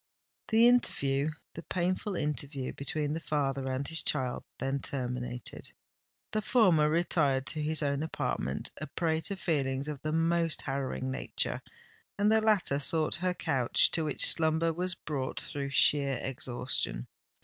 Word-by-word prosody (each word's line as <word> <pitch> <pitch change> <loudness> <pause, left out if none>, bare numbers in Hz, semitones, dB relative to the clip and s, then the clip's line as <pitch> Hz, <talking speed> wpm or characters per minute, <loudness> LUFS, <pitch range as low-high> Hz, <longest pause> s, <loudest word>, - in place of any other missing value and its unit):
The 225 +2 +5
interview—the 155 - 0
painful 185 +3 -2
interview 140 -3 -3
between 150 +1 -2
the 160 - -2
father 140 -4 -1
and 130 +2 -2
his 160 0 0
child 130 -4 -1
then 135 +1 -1
terminated. 125 -2 -5 0.6
The 215 - 0
former 185 -10 +4
retired 150 -5 +1
to 155 - -1
his 155 +1 +1
own 140 0 0
apartment, 160 - -2
a - - -4
prey 160 -2 -1
to 200 - -2
feelings 140 -6 -1
of 150 -3 -5
the 155 - -2
most 165 0 +1
harrowing 135 -1 -3
nature; 130 - -2 0.6
and 205 +1 +3
the 220 0 +4
latter 205 -10 +2
sought 155 +2 +2
her 180 +2 +1
couch, 130 -7 +3
to 165 - +1
which 150 -2 +2
slumber 160 0 +3
was 180 +2 -2
brought 135 -4 -4
through 140 -1 -5
sheer 140 -1 +3
exhaustion. 125 - -2
150 Hz, 145 wpm, -30 LUFS, 135-170 Hz, 0.6 s, The